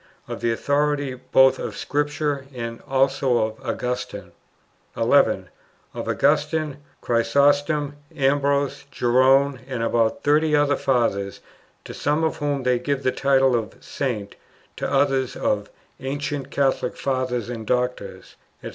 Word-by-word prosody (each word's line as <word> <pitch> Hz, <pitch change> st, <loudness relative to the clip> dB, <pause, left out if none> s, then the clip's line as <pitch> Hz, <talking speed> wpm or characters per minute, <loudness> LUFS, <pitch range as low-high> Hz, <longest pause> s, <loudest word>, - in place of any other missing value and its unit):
Of -, -, -6 dB
the 115 Hz, -, +1 dB
authority 145 Hz, +2 st, 0 dB
both 130 Hz, +1 st, +3 dB
of -, -, -5 dB
Scripture 145 Hz, -1 st, -2 dB
and 115 Hz, -1 st, -5 dB
also 135 Hz, -2 st, +2 dB
of 110 Hz, -1 st, -2 dB
Augustine. 125 Hz, 0 st, -4 dB, 0.7 s
11. -, -, +3 dB, 0.4 s
Of -, -, -5 dB
Augustine, 150 Hz, -1 st, +1 dB, 0.2 s
Chrysostom, 145 Hz, +4 st, +2 dB, 0.2 s
Ambrose, 140 Hz, 0 st, +1 dB
Jerome, 130 Hz, +2 st, +3 dB
and 125 Hz, -4 st, -3 dB
about 115 Hz, -1 st, +1 dB
thirty 150 Hz, +1 st, +3 dB
other 145 Hz, -1 st, +3 dB
Fathers, 100 Hz, -7 st, 0 dB, 0.5 s
to -, -, -8 dB
some 150 Hz, +2 st, 0 dB
of 160 Hz, -, 0 dB
whom 145 Hz, -2 st, -1 dB
they 125 Hz, -1 st, +2 dB
give 140 Hz, +2 st, -2 dB
the 130 Hz, -, +2 dB
title 135 Hz, -2 st, +3 dB
of 115 Hz, -2 st, -3 dB
"Saint," 110 Hz, -8 st, -4 dB, 0.4 s
to -, -, -3 dB
others 135 Hz, -2 st, +1 dB
of 105 Hz, -1 st, -1 dB, 0.3 s
"ancient 140 Hz, +1 st, -4 dB
Catholic 135 Hz, -2 st, 0 dB
Fathers 130 Hz, -3 st, -1 dB
and 115 Hz, -3 st, -6 dB
doctors, 125 Hz, 0 st, -2 dB, 0.3 s
&c." -, -, -5 dB
135 Hz, 130 wpm, -23 LUFS, 125-145 Hz, 0.7 s, both